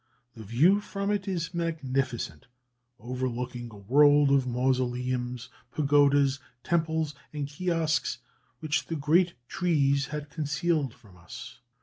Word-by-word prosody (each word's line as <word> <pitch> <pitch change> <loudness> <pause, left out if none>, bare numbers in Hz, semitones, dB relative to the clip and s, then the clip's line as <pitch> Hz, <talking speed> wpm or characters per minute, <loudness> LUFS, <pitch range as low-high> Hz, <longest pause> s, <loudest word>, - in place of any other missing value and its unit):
The 110 - -10
view 150 - +4
from 200 0 -3
it 200 -2 -1
is 175 -3 -2
magnificent, 135 -7 -2 0.5
overlooking 125 0 -4
a 105 - -12
world 145 +7 +5
of 135 -2 +3
mausoleums, 125 -1 -1 0.2
pagodas, 140 -1 +3 0.2
temples, 160 -2 0 0.2
and 145 -2 -3
kiosks, 160 +1 0 0.4
which 155 -2 -1
the 165 - -3
great 170 +4 +2
trees 140 -6 +1
had 150 -1 -6
concealed 150 -3 -1
from 105 -7 -19
us. 85 -1 -10
140 Hz, 115 wpm, -28 LUFS, 125-160 Hz, 0.5 s, world